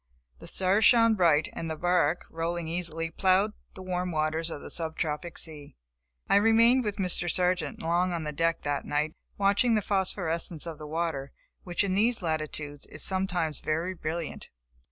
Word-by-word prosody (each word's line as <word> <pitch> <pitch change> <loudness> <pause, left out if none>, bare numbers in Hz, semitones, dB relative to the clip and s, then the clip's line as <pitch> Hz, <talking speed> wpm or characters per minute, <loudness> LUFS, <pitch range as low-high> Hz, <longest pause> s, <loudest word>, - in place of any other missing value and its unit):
The - - -9
stars 190 +3 +2
shone 230 -1 +6
bright, 165 -6 +3
and 165 - -5
the 160 - -2
bark, 175 -1 +1
rolling 165 +1 -3
easily, 165 -1 -2
plowed 190 +4 +2 0.2
the 185 - -8
warm 180 -1 -2
waters 155 +1 0
of 145 - -7
the - - -7
sub 160 -2 -2
tropic 160 +1 -3
sea. 150 -3 -4 0.5
I - - +5
remained 230 +4 +5
with 210 -2 -2
Mr. 180 -3 +1
Sargent 180 -5 0
long 175 +2 +1
on 170 -2 -2
deck 165 +2 0
that 145 -1 -1
night, 150 +2 -1 0.2
watching 205 +4 +3
the 215 - +2
phosphorence 175 -5 -1
of 165 -2 -7
the 150 - -7
water, 155 -4 -2 0.3
which 175 +2 0
in 195 -2 0
these 220 +2 +2
latitudes, 155 -2 -3
is 145 - -6
sometimes 180 -5 0
very 165 +4 -1
brilliant. 165 -1 -5
170 Hz, 170 wpm, -28 LUFS, 160-190 Hz, 0.5 s, shone